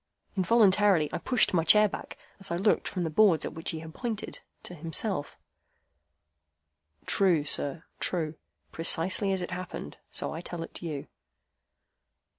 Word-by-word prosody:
Involuntarily 195 -4 +4
I - - -2
pushed 250 -6 +2
my 165 -2 +3
chair 210 +6 +6
back, - - -8 0.2
as 195 - -6
I 170 - -1
looked 195 +5 +1
from 180 - -3
the 160 - -2
boards 185 -2 +4
at - - -5
which 160 - -4
he 160 0 -4
pointed 215 +7 -5 0.2
to - - -7
himself. 165 0 -1 1.7
"True, 175 -7 +2
sir. 150 +3 -1 0.2
True. 160 -4 -1 0.4
Precisely 185 +4 +2
as 190 -2 -1
it - - -6
happened, 180 - -6
so - - -3
I 160 - -6
tell 175 -1 -6
it - - -9
you." 155 -5 -5
175 Hz, 145 wpm, -28 LUFS, 160-195 Hz, 1.7 s, chair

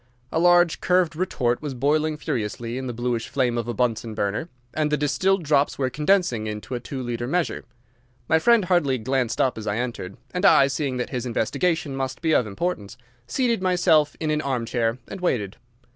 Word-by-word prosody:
A 160 - 0
large 175 -1 +4
curved 180 -3 +2
retort 125 -9 -1
was 145 -3 -5
boiling 150 +4 +1
furiously 115 -2 -3
in 130 - -5
the - - -2
bluish 120 -1 -2
flame 125 -3 0
of 120 -1 -2
a 120 - -2
Bunsen 115 -1 -1
burner, 105 - -2 0.2
and 150 0 0
the 150 - +2
distilled 155 +7 +1
drops 145 -1 +2
were 130 -2 -1
condensing 150 - +1
into 105 +4 -6
a 125 - -2
two 130 +2 -6
litre 120 0 -3
measure. 175 +4 -1 0.6
My 160 - +4
friend 230 +3 +4
hardly 160 -8 +2
glanced 125 0 -1
up 130 -4 +1
as 110 - -7
I 100 +1 0
entered, 115 -6 -4 0.2
and 180 +1 -2
I, 195 -8 +7
seeing 135 -1 -2
that 125 - -3
his 125 -2 -3
investigation 145 +5 0
must 135 -1 -3
be 160 -1 +2
of 120 - +3
importance, 105 - -4 0.3
seated 235 - 0
myself 175 -5 +3
in 155 -1 -1
an 150 0 0
armchair 120 -4 -1
and 190 - -8
waited. 105 - -1
135 Hz, 190 wpm, -24 LUFS, 120-160 Hz, 0.6 s, I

